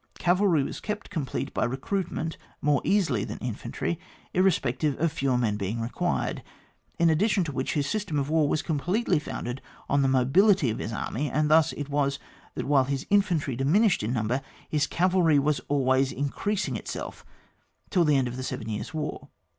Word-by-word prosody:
Cavalry 180 -4 +3
was - - -5
kept 210 -1 -5
complete 150 -9 -3
by - - 0
recruit 135 +10 -2
ment 160 0 -3 0.2
more 145 -2 +2
easily 165 - +2
tlian - - -5
infantry, 125 +7 -3 0.3
irres 185 +1 +4
pective 135 +3 -1
of 165 -1 +1
fewer 135 -5 0
men 110 -4 0
beiug 100 +4 -2
required; 115 +1 -1 0.6
in 170 -1 +4
addition 195 +4 +2
to 160 - -4
which, 130 -1 -2
his 145 -2 +1
system 195 -5 -2
of 140 -1 0
war 155 -1 +2
was 155 - 0
completely 175 +4 +1
founded 125 -3 -5 0.3
on 140 0 +2
the 135 - +3
mobility 135 - +4
of 110 - -4
his 110 - -4
army, 135 +6 -2
and 150 0 +1
thus 155 -1 +5
it 145 - -5
was, 140 -1 +1 0.4
that - - -3
while 135 -2 +4
his 140 0 -2
infantry 175 - +2
diminished 175 - +3
in 105 +2 -2
number, 120 +2 0 0.3
his 145 -2 +1
cavalry 180 -3 +3
was 145 +1 +2
always 135 -1 +2
increasing 180 +10 -2
itself - - -6 0.7
till 180 -4 +4
the 150 -3 +3
end 130 -2 +2
of 125 +1 -5
the 130 - -4
Seven 110 -3 -4
Years* 110 +9 -4
War. 150 -1 -4
145 Hz, 185 wpm, -27 LUFS, 130-170 Hz, 0.7 s, thus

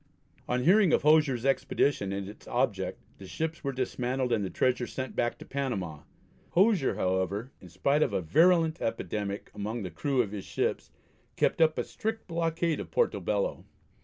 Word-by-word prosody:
On 125 0 +1
hearing 190 +1 +5
of - - +3
Hosier's 145 -5 +4
expedition 135 -5 +1
and 100 0 -3
its 105 - -12
object - - -1 0.2
the 95 - -10
ships 160 - -4
were 140 - -1
dismantled 130 0 -2
and 110 -3 +1
the 95 - -2
treasure 125 +2 +1
sent 130 0 -5
back 120 - 0
to - - -11
Panama. 100 - -3 0.5
Hosier, 190 -5 +3
however, 95 +6 -1
in 90 - -12
spite 140 - +1
of - - +2
a 100 - 0
virulent 160 - +3
epidemic 105 -2 -3
among 110 +2 -4
the 90 - -5
crew 125 - +1
of 100 - -7
his 100 -2 -5
ships, - - -2 0.5
kept - - +1
up 160 -1 +4
a - - 0
strict 220 +1 -4
blockade 165 -1 -1
of - - -6
Porto 480 - +1
Bello. - - -1
130 Hz, 175 wpm, -29 LUFS, 100-160 Hz, 0.5 s, hearing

